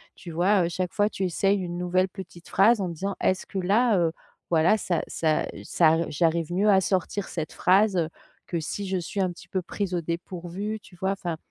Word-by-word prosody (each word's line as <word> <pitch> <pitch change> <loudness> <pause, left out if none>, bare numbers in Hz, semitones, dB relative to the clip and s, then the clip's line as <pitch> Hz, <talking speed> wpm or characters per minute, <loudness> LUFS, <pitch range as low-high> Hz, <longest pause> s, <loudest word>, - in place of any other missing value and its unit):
tu 175 - -10
vois? 180 +3 +3
Heu, - - -1
chaque 180 +1 -3
fois 205 0 +2
tu 195 - -4
essayes 195 +2 +2
une 175 -2 -4
nouvelle 180 +1 +2
petite 180 -3 -11
phrase 215 +3 +4
en 185 - -1
disant: 190 +4 -3
«Est-ce 185 - +1
que - - -6
là, 210 +4 +3
heu, 170 -2 +2 0.4
voilà, 165 +6 +4
ça 175 -5 -1
ça 155 -2 0 0.2
ça 165 0 +3
j'arrive 165 +2 +1
mieux 200 +4 +3
à 190 -2 +6
sortir 190 +1 -1
cette 160 -3 -4
phrase, 195 +1 +3
heu, 165 -2 +1 0.4
que 170 - -2
si 195 +5 -4
je 190 0 0
suis 185 +3 -3
un 185 -1 +1
petit 175 - -13
peu 185 -1 -2
prise 190 0 -3
au 175 - 0
dépourvu» 175 +5 -4
tu 190 - -17
vois? 190 +2 -1
Enfin, 175 -4 -4
185 Hz, 215 wpm, -26 LUFS, 170-195 Hz, 0.4 s, à